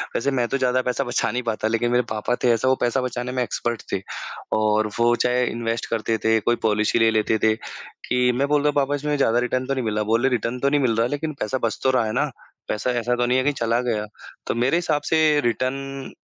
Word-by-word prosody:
वैसे 140 - 0
मैं 125 -3 0
तो 135 - -1
ज़्यादा 130 -1 +1
पैसा 125 +2 -1
बचा 120 -1 -1
नहीं 125 0 -2
पाता, 110 -1 -1
लेकिन 115 +1 0
मेरे 125 0 +3
पापा 110 +3 -1
थे 125 - +4
ऐसा 115 +3 0
वो 130 - +4
पैसा 120 +2 +1
बचाने 125 0 -3
में 125 -1 0
एक्सपर्ट 120 -1 -3
थे 95 - -1 0.6
और 110 0 +2
वो 120 0 +4
चाहे 125 +1 +1
इन्वेस्ट 115 0 -2
करते 115 0 0
थे, 110 0 +4
कोई 120 +3 +1
पॉलिसी 110 0 +1
ले 115 0 +4
लेते 110 0 +1
थे 110 0 +4 0.5
कि 125 0 +2
मैं 140 +3 +1
बोलता 150 0 +2
हूँ, 145 - -1
"पापा 145 0 +1
इसमें 150 +1 -1
ज़्यादा 120 -3 +3
रिटर्न 125 +1 -1
तो 135 - 0
नहीं 130 - -2
मिला।" 105 -1 0
बोले, 115 +4 +2
"रिटर्न 125 0 -2
तो 140 - +2
नहीं 145 0 +2
मिल 115 -4 +2
रहा 115 +1 +2
लेकिन 150 +4 -3
पैसा 130 +5 -1
बच 115 - -1
तो 130 - +4
रहा 125 -3 +2
है 110 - -2
ना? - - +1 0.4
पैसा 105 +4 -2
ऐसा 120 +1 0
तो 120 - +1
नहीं 125 +1 +2
है 130 - +2
कि 145 - +2
चला 115 -2 0
गया।" 110 -4 -1 0.4
तो - - -1
मेरे 125 +7 +2
हिसाब 160 -4 0
से 155 -2 +4
रिटर्न 135 +3 -2
125 Hz, 245 wpm, -23 LUFS, 115-135 Hz, 0.6 s, थे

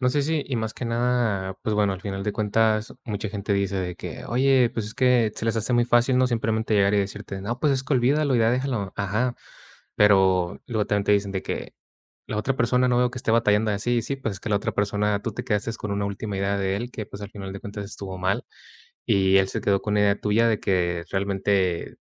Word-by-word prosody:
no 125 - +2
sé, 145 +3 +1
si 155 0 0
y 130 - -2
más 110 -1 -2
que 125 - -6
nada, 115 -5 0
pues, 110 - -1
bueno, 105 -2 +2
al 95 - -6
final 100 -1 -4
de 105 0 -1
cuentas, 110 +1 +1
mucha 105 -1 -3
gente 100 0 -3
dice 100 -1 0
de 90 -2 -3
que: - - -7
"Oye, 130 -1 +3
pues, 110 -3 -3
es 110 - -8
que", 125 -4 +3
se - - -5
les 115 0 0
hace 115 +3 0
muy 120 0 +4
fácil, 120 +2 +3
¿no?, 130 0 +4
simplemente 110 -2 0
llegar, 100 0 +3
y 105 - +4
decirte: 100 0 -4
"No, 120 +4 -3
pues, 150 -2 +3
es 130 - -1
que, 145 - -2
olvídalo 135 +2 +2
y - - +3
ya 115 0 +4
déjalo", 125 -6 -1
ajá, 110 +5 0 0.6
pero 95 -3 +3
luego 110 -4 -1
también 105 -1 0
te - - +3
dicen 100 -1 +1
de 95 - -2
que: - - -5 0.5
"La 105 - -3
otra 130 +5 -1
persona 125 +2 +2
no 125 - +2
veo 125 -1 +2
que 125 - -7
esté 115 - -1
batallando 110 -1 +3
así", 120 +4 0
sí, 135 +4 -3
pues, 115 -6 -3
es - - -10
que, - - -5
la 100 - +3
otra 100 - -2
persona, 105 0 0
tú 115 - -3
te - - -5
quedaste 110 0 -1
con 105 -3 -5
una 100 0 -1
última 100 0 -4
idea 100 +1 0
de 95 0 0
él, 120 +3 -4
que, 110 -3 -5
pues, 100 - -10
al 100 - -7
final 95 -2 -7
de 100 - -7
cuentas 100 0 -6
estuvo 100 -2 -7
mal. 95 +2 0 0.6
Y 95 0 +4
él 95 0 +2
se - - -3
quedó 100 -1 +2
con 105 -1 -1
una 105 - +3
idea 100 0 +2
tuya 110 +3 +3
de 110 - 0
que 90 -2 0
realmente, 95 -2 0
105 Hz, 250 wpm, -24 LUFS, 100-120 Hz, 0.6 s, muy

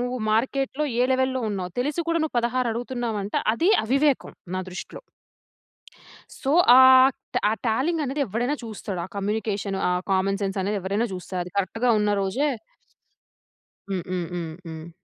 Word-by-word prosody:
నువ్వు 250 +1 -2
మార్కెట్‌‌లో 270 +5 0 0.2
ఏ - - +5
లెవెల్‌లో 260 0 +1
ఉన్నావు. 185 -3 -4
తెలిసి 295 +6 -1
కూడా 335 0 +1
నువ్వు 315 - -3
16 240 +1 0
అడుగుతున్నావు 240 -1 -3
అంటే, 205 - -1 0.2
అది 340 - +2
అవివేకం 275 +4 +1 0.2
నా - - -1
దృష్టిలో. 180 - -8 1.4
సో, 270 - -2 0.3
ఆహ్, 260 0 +8 0.4
ఆ - - +1
టాలింగ్ 285 +9 +1
అనేది 275 +2 -3
ఎవడైనా 240 +8 -1
చూస్తాడు. 205 -4 -5
ఆ - - -6
కమ్యూనికేషన్ 200 -1 -2
ఆ - - +1 0.2
కామన్ 195 +1 +1
సెన్స్ 195 0 -2
అనేది 200 +2 -1
ఎవరైనా 200 +5 -1
చూస్తారు. 180 0 -5
అది 180 - -11
కరెక్ట్‌గా 225 +6 0
ఉన్న 210 0 +1
రోజే 225 +10 0 1.4
హ్మ్, 190 -3 -2
హ్మ్, 180 -2 -2
హ్మ్. 170 -2 -4 0.2
హ్మ్. 160 0 -8
225 Hz, 150 wpm, -24 LUFS, 195-260 Hz, 1.4 s, ఆహ్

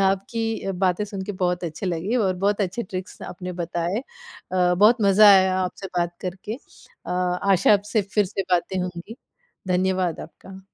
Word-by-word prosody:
आपकी 220 +4 0
अ, 195 - -1
बातें 185 +2 0
सुन 200 -2 -6
के 205 - -4
बहुत 180 -1 -1
अच्छे 170 +4 -5
लगीं 180 +7 -1
और 195 -6 +1
बहुत 200 +3 0
अच्छे 195 +4 -1
ट्रिक्स 185 -2 -7
आपने 180 0 -6
बताए 170 +3 -2 0.5
अ, 180 -1 +3
बहुत 210 +6 +5
मज़ा 200 +1 +7
आया 190 -1 +5
आपसे 185 +1 -4
बात 175 0 -1
करके। 190 +4 -5 0.5
अ, - - -5
आशा 180 +1 +2
है 210 - +8
आपसे 210 +2 -1
फिर 210 -1 +4
से 195 +1 -3
बातें 180 +2 +1
होंगी, 180 +5 -6 0.5
धन्यवाद 185 -2 0
आपका। 190 +4 -12
190 Hz, 175 wpm, -23 LUFS, 180-200 Hz, 0.5 s, है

